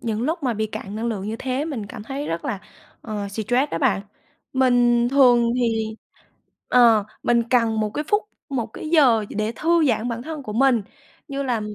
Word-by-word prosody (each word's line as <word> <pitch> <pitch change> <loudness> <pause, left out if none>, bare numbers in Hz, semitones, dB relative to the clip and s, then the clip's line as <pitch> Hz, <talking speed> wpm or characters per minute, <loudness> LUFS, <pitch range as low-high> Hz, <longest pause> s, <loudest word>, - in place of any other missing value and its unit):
Những 225 -2 -2
lúc 320 +4 -1
mà 250 -3 0
bị 220 +1 -1
cạn 205 -1 -7
năng 220 +2 -3
lượng 210 -3 -3
như 220 - -3
thế 260 +2 -2
mình 265 -10 -4
cảm 215 0 -9
thấy 275 +6 -5
rất 165 +1 -3
là, 200 - -2 0.4
ờ, 210 -3 -4
stress 245 +7 0
đó - - -2
bạn. 225 -8 +2 0.5
Mình 245 -2 +3
thường 245 -3 +5
thì 225 -3 -1 0.7
ờ, 230 -4 +5 0.2
mình 235 -1 +3
cần 230 -3 +2
một 210 -1 -1
cái 300 +8 -3
phút, 415 +1 +2 0.3
một 255 -6 -2
cái 240 +7 -8
giờ 265 -9 +4
gì - - -8
để 215 +2 -1
thư 335 0 +2
giãn 235 0 0
bản 235 0 -4
thân 310 +1 -6
của 215 -5 -6
mình, 250 -1 +3 0.5
như 275 0 -3
là 245 -5 -1
240 Hz, 205 wpm, -22 LUFS, 220-265 Hz, 0.7 s, thường